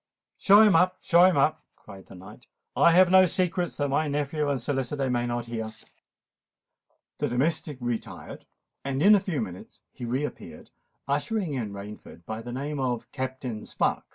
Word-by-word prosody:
"Show 205 +2 +7
him 210 -4 +5
up—show 180 0 +4
him 185 -4 +3
up," 145 +3 +1
cried 95 -2 -14
the - - -13
knight. 105 +7 -14 0.3
"I - - +5
have 180 +1 +5
no 185 0 +7
secrets 180 0 -1
that 145 -1 -1
my 150 +3 +1
nephew 145 +1 -1
and 140 -2 0
solicitor 135 +1 -2
may 120 0 0
not 120 0 -3
hear." 115 -2 -5 1.5
The - - 0
domestic 145 +3 -1
retired; 120 -2 -6 0.4
and 135 +1 -2
in 210 - +7
a 205 - +6
few 185 -7 -3
minutes 90 -3 -10
he 120 - -8
re 130 +5 -1
appeared, - - -10 0.4
ushering 150 +5 -1
in 115 -6 -3
Rainford 100 -3 -10
by 110 0 -5
the 120 +1 -8
name 140 +3 -4
of 125 -3 -3
Captain 130 -4 -5
Sparks. - - -2
135 Hz, 170 wpm, -26 LUFS, 120-165 Hz, 1.5 s, Show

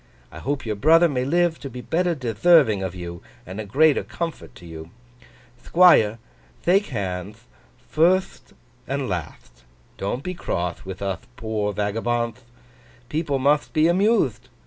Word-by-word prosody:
I - - -10
hope 140 -1 -3
your 110 -2 -2
brother 165 +10 +5
may 130 -5 -2
live 170 +2 +1
to 140 - -7
be 125 0 -8
better 175 +4 0
detherving 120 - +3
of 95 -1 -4
you, 85 -1 -7 0.2
and 95 +4 -6
a - - -7
greater 145 +8 +3
comfort 170 -1 -6
to 90 - -14
you. 80 -1 -9 0.7
Thquire, 165 -12 +5 0.5
thake 195 +4 +3
handth, 100 -1 -5 0.5
firtht 185 +4 +1 0.3
and 140 +1 -2
latht! 75 - -6 0.4
Don't 110 +7 -3
be 180 - -4
croth 90 - -4
with 95 +1 -7
uth 100 +4 -4
poor 110 -3 -2
vagabondth. 115 +4 -2 0.7
People 150 -2 -1
mutht 145 +3 +1
be 155 -1 +2
amuthed. 175 - +1
125 Hz, 145 wpm, -23 LUFS, 100-160 Hz, 0.7 s, brother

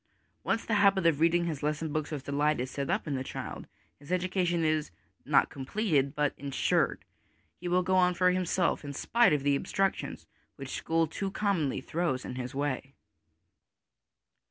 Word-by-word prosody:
Once 225 - 0
the 225 - -1
habit 195 -3 +4
of 160 -4 +3
reading 170 +1 +3
his 155 -5 -3
lesson 150 +1 -2
books 155 -1 -1
with 150 -4 -5
delight 145 +1 +1
is 125 +1 -3
set 140 +1 -3
up 190 +4 0
in 145 - -1
a - - -3
child, - - -6 0.3
his 145 +4 -11
education 180 -2 +1
is 155 -1 +1 0.4
not - - +3
completed, 140 -1 0
but 150 -1 +1
ensured; 140 -1 0 0.5
he 175 - -5
will 180 +1 +2
go 185 +1 +1
on 180 -1 +4
for 180 +1 +4
himself 180 -2 0
in 145 -1 -6
spite 235 - +3
of 145 -2 +1
the 140 0 +3
obstructions 195 +7 -1 0.3
which 135 -1 -8
school 165 +3 0
too 195 +5 -4
commonly 190 -9 0
throws 155 -6 -2
in - - -5
his 125 0 -5
way. 140 -1 -3
155 Hz, 175 wpm, -30 LUFS, 140-180 Hz, 0.5 s, habit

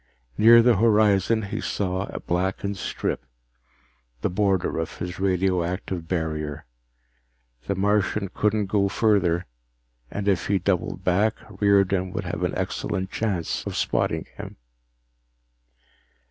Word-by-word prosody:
Near 115 - +7
the 120 -3 +4
horizon 110 0 +3
he 105 +2 -4
saw 95 -1 -2
a - - -6
blackened 95 +3 -2
strip, 90 - -3 1.0
the - - 0
border 95 -3 +1
of 80 - -4
his 90 0 -5
radioactive 90 -2 -1
barrier. 75 -4 -3 1.0
The 100 - 0
Martian 100 0 +1
couldn't 105 +2 0
go 100 0 +1
further, 95 -5 +2 0.6
and 105 0 -4
if 95 -4 +1
he 100 - +2
doubled 95 0 -1
back 100 +5 +2
Riordan 100 -2 +2
would - - -3
have - - -4
an - - -1
excellent 95 0 -3
chance 100 -7 -2
of - - -4
spotting - - 0
him. - - -8
95 Hz, 120 wpm, -24 LUFS, 90-105 Hz, 1.0 s, Near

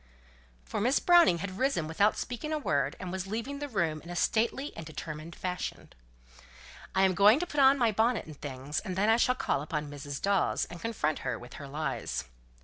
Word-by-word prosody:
For - - -3
Miss 250 +6 +3
Browning 345 - +6
had 185 0 -7
risen 260 - +1
without 200 +7 +2
speaking 250 +6 -4
a 310 - +1
word, 140 - 0
and 180 - -5
was 190 0 -4
leaving 230 +7 -4
the 290 0 -4
room 165 - -1
in 170 - -12
a 175 - -5
stately 235 +9 0
and 165 - -6
determined 155 +1 -7
fashion. 180 -1 -5 1.0
"I'm 190 0 +4
going 205 +7 +6
to 355 - -1
put 295 -4 -3
on 270 0 +7
my 235 -4 +3
bonnet 225 +3 +1
and 155 - -10
things, 140 +1 -3
and 190 -4 -5
then 205 +3 +2
I 225 - +5
shall 250 +1 +3
call 140 - 0
upon 150 -1 -4
Mrs. 145 -1 -6
Dawes, 200 -1 +1
and 175 - -9
confront 180 -10 -1
her 125 -3 -2
with 120 +2 -12
her 140 - -7
lies." 145 0 -3
190 Hz, 205 wpm, -30 LUFS, 155-235 Hz, 1.0 s, on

